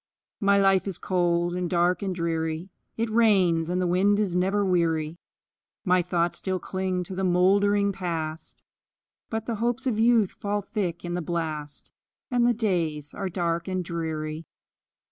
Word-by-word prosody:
My 200 0 +4
life 195 -1 +3
is 195 - -3
cold, 175 -2 +1
and 180 -1 -2
dark, 175 0 +2
and 190 -2 -2
dreary; 165 0 -2 0.3
It 225 0 -1
rains, 190 -8 +3
and 180 +1 0
the 185 - +1
wind 195 +4 +3
is 195 -4 0
never 195 +3 +1
weary; 165 -3 0 0.7
My 180 -1 +4
thoughts 175 -1 -1
still 190 -1 -1
cling 185 0 -2
to 185 - -8
the 190 +1 -2
moldering 200 +3 +3
Past, 165 -4 -5 0.7
But 220 -1 -3
the 230 -2 -3
hopes 240 +2 0
of 235 -5 0
youth 225 -4 +4
fall 205 0 -3
thick 190 -5 -3
in 175 - -3
the 175 - -1
blast, 155 -3 -4 0.4
And 240 -1 +3
the 245 - +4
days 165 -9 -1
are 195 -1 -3
dark 170 -1 -1
and 185 -1 -2
dreary. 160 -2 -4
180 Hz, 165 wpm, -26 LUFS, 170-200 Hz, 0.7 s, My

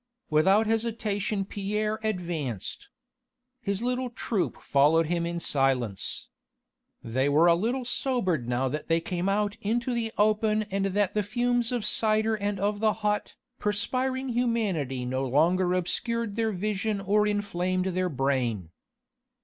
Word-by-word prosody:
Without 190 +8 +4
hesitation 215 -3 -1
Pierre 210 +2 -2
advanced. 170 - -3 0.7
His 200 +1 -2
little 250 +1 -1
troop 225 -5 -2
followed 150 +4 +3
him 170 +1 -1
in 170 0 -3
silence. 130 - 0 0.7
They 130 +5 0
were 150 +4 +5
a 170 - +7
little 240 +9 -1
sobered 190 - 0
now 125 +2 +1
that 150 +4 -4
they 165 0 +3
came 175 +2 -2
out 205 0 0
into 240 +4 0
the 230 -2 -1
open 215 0 +2
and 195 0 0
that 200 0 0
the 210 - +1
fumes 240 +3 0
of 240 -4 -1
cider 220 0 +2
and 205 -2 -2
of 205 +1 -1
hot, 210 -1 0 0.2
perspiring 255 +5 -1
humanity 205 - 0
no 130 +2 -1
longer 175 +7 +3
obscured 230 +4 -1
their 225 -1 +1
vision 210 +2 -1
or 210 +2 +2
inflamed 185 -3 -1
their 185 0 0
brain. 125 - -1
200 Hz, 135 wpm, -27 LUFS, 165-220 Hz, 0.7 s, a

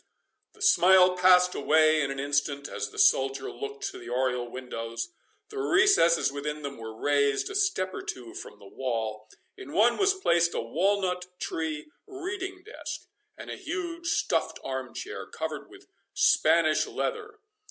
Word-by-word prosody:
The 430 - -9
smile 185 - +6
passed 180 0 +5
away 155 +1 +3
in 140 - -1
an 135 0 -4
instant, 145 0 -1
as - - -4
the - - -15
soldier 135 0 +3
looked 425 0 -7
to 380 - -10
the - - -10
oriel 125 -1 -1
windows. 115 -2 -5 0.4
The 420 -1 -6
recesses 380 - +4
within 150 +1 -5
them 140 -3 -6
were 110 0 -8
raised 140 - +1
a - - -7
step 390 - 0
or - - -5
two 120 -3 -7
from - - -9
the 100 - -16
wall. 110 -2 -4 0.3
In 140 - -10
one 230 +3 +4
was 395 -1 +3
placed 170 - +2
a - - 0
walnut 180 - 0
tree 155 -2 -4 0.2
reading 380 -1 -6
desk, 435 +4 -7 0.4
and - - -8
a - - -4
huge 340 -1 -5
stuffed 330 - 0
arm 130 -2 -5
chair, 420 - -6
covered - - -5
with 390 0 -16 0.3
Spanish - - +3
leather. 435 -2 -4
165 Hz, 160 wpm, -27 LUFS, -, 0.4 s, smile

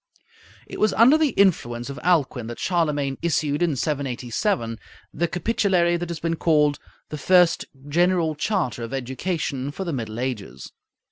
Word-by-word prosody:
It - - -9
was 215 -1 +3
under 240 +6 +6
the 315 -2 +3
influence 120 -12 +2
of 140 - -7
Alcuin 145 -9 +1
that 120 - -7
Charlemagne 150 -6 -1
issued 150 -3 0
in 170 -4 +2
787 125 - -2 0.3
the 170 +3 0
capitulary 180 -2 +1
that 175 0 -4
has 170 -2 -4
been 165 0 -2
called 150 -3 +2 0.3
"the 150 - -6
first 180 +1 +4 0.2
general 170 +1 +2
charter 155 - -1
of 115 +3 -4
education 135 +1 -3
for 160 +7 -5
the 170 -4 -3
Middle 115 -3 -4
Ages." 105 - -5
155 Hz, 150 wpm, -23 LUFS, 130-175 Hz, 0.3 s, under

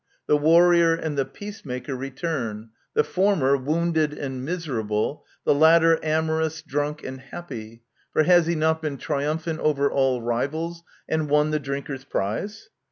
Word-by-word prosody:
The - - +3
warrior 165 +2 +5
and 160 -2 -4
the 135 -1 +1
peacemaker 135 - -7
return* 130 -5 -4
— - - -43
the 455 - +4
former 185 - +2
wounded 155 +2 0
and 130 -3 -5
miser 160 -5 -3
able, 105 +6 -2 0.2
the - - +5
latter 165 +2 +5
amorous,, 160 0 0
drunk, 150 0 -2
and 130 0 -6
happy; 115 -7 -9 0.3
for 155 - +3
has 175 -1 +5
he 170 - +1
not 160 0 +1
been 150 -3 -3
triumphant 155 +4 -2
over 140 -2 +1
all 135 -2 +2
rivals 155 +8 -2 0.3
and 155 -2 -1
won 150 +1 +3
the 155 - +1
drinker's 140 -1 -5
prize 135 - -3
150 Hz, 155 wpm, -24 LUFS, 135-165 Hz, 0.3 s, warrior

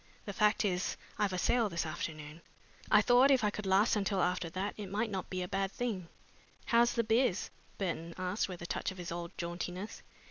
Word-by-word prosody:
The 200 - -4
fact 210 +2 +3
is 180 -2 0 0.2
I've 205 -2 +2
a 185 - -2
sale 230 +4 +2
this 170 -2 -2
afternoon. 155 -1 -5 0.5
I - - +6
thought 250 +2 +6
if 265 -4 +4
I 210 - +3
could 210 -1 -5
last 195 +5 +4
until 200 -1 0
after 180 -1 +1
that 185 +4 -3
it 205 -3 -6
might 215 +3 -1
not 190 -2 -3
be 185 -1 -2
a - - -4
bad 195 +1 -1
thing." 210 -8 -3 0.6
"How's 235 0 +4
the 235 - +1
biz?" 225 -3 +2 0.3
Burton 170 -3 -3
asked 185 +3 -1
with 175 -2 -7
a - - -5
touch - - -2
of 190 - -8
his 175 -2 -6
old 170 0 -4
jauntiness. 180 +3 -4
190 Hz, 210 wpm, -33 LUFS, 175-210 Hz, 0.6 s, I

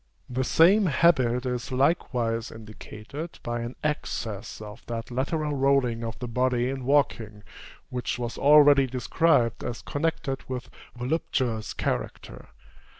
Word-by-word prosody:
The 130 +1 -2
same 185 +9 +5
habit 130 -5 +3
is 125 -1 -3
likewise 125 -5 0
indicated 110 +7 -9
by 120 0 -3
an 120 +2 -6
excess 115 -8 -3
of 105 +1 -10
that 115 0 -5
lateral 150 +4 -1
rolling 135 -4 +2
of 115 -1 -5
the 125 - -5
body 125 +1 +1
in 135 -2 -5
walking, 115 -7 +1 0.5
which 125 0 -3
was 120 -1 -4
already 145 -1 +6
described 125 -1 +1
as 120 - -5
connected 145 -3 -2
with 130 -1 -5 0.3
voluptuous 125 -4 -2
character. - - -4
125 Hz, 125 wpm, -26 LUFS, 115-140 Hz, 0.5 s, already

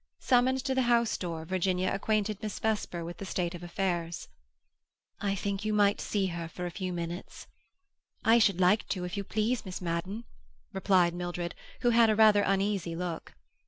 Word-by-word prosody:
Summoned 255 +1 +2
to 265 - +1
the 260 - +2
house 235 -1 +3
door, 165 -3 -4
Virginia 185 +1 0
acquainted 210 +1 0
Miss 215 -2 -4
Vesper 210 -6 -2
with 175 +1 -7
the - - -7
state 180 -2 -2
of 175 - -8
affairs. 175 -1 -3 0.9
"I 200 -1 0
think 200 +1 -3
you 215 0 0
might 205 -1 +3
see 200 -2 0
her 170 -1 -4
for 180 +2 -6
a 175 - -4
few 185 +1 -4
minutes." 170 +1 -6 0.8
"I 230 +1 +6
should 200 -5 +3
like 185 +4 +3
to, 185 -2 -2
if 180 - -5
you 200 - -2
please, 220 +5 -1
Miss 185 -2 -6
Madden," 180 +5 -3 0.5
replied 185 -3 +3
Mildred, 175 0 -4 0.3
who 240 - +3
had 230 -1 +5
a 215 - +3
rather 215 -1 +6
uneasy 195 -3 0
look. 175 -1 -5
195 Hz, 180 wpm, -30 LUFS, 175-215 Hz, 0.9 s, I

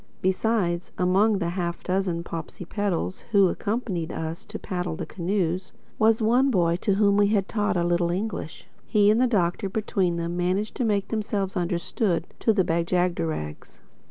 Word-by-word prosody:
Besides, 185 -2 0
among 195 +4 +3
the 170 -3 -1
half 175 -1 -3
dozen 185 -2 -1
Popsipetels 180 +3 -3
who 200 -2 +6
accompanied 200 -7 -2
us 160 +1 -5
to 215 +1 -7
paddle 180 -5 -3
the - - -5
canoes, 185 0 -2 0.3
was 220 +1 +4
one 250 +5 +4
boy 170 -7 +2
to 195 +2 +1
whom 200 0 +3
we 205 0 +5
had 200 -2 +1
taught 210 -2 0
a 170 - +2
little 175 0 +1
English. 185 -3 -4 0.2
He 210 -1 +4
and 225 +3 +3
the 255 - +4
Doctor 195 -3 0
between 190 -3 0
them 170 0 -3
managed 185 +4 0
to 250 - 0
make 205 -3 0
themselves 210 -3 -2
understood 175 +1 0
to 225 - +3
the 200 -3 +3
Bag 170 0 0
jagderags. 170 - -2
185 Hz, 165 wpm, -25 LUFS, 170-210 Hz, 0.3 s, who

